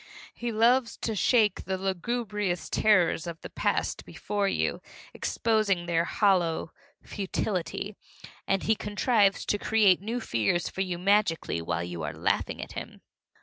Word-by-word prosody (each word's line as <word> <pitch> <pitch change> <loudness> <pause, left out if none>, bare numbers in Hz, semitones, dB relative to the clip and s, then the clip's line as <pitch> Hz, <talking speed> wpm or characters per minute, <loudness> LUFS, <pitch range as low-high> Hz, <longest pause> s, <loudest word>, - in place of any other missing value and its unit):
He 240 0 -4
loves 235 +2 +3
to 225 - -3
shake 215 0 +2
the 190 0 -2
lugubrious 195 0 -2
terrors 180 -5 +3
of 165 -1 -6
the - - -9
past - - -1
before 205 -1 -2
you, - - -1 0.3
exposing 215 -6 0
their 170 -1 +1
hollow 175 -6 +1 0.3
futility, 195 0 -3 0.5
and 195 -1 +1
he 220 - +3
contrives 210 -1 +1
to 205 - 0
create 205 -5 +4
new 230 +4 -3
fears 115 - 0
for 190 - -4
you 180 -2 -2
magically 190 - +1
while 85 +1 -2
you 85 -1 -6
are 75 -1 -4
laughing - - -1
at - - -10
him. - - -8
195 Hz, 145 wpm, -28 LUFS, 175-215 Hz, 0.5 s, create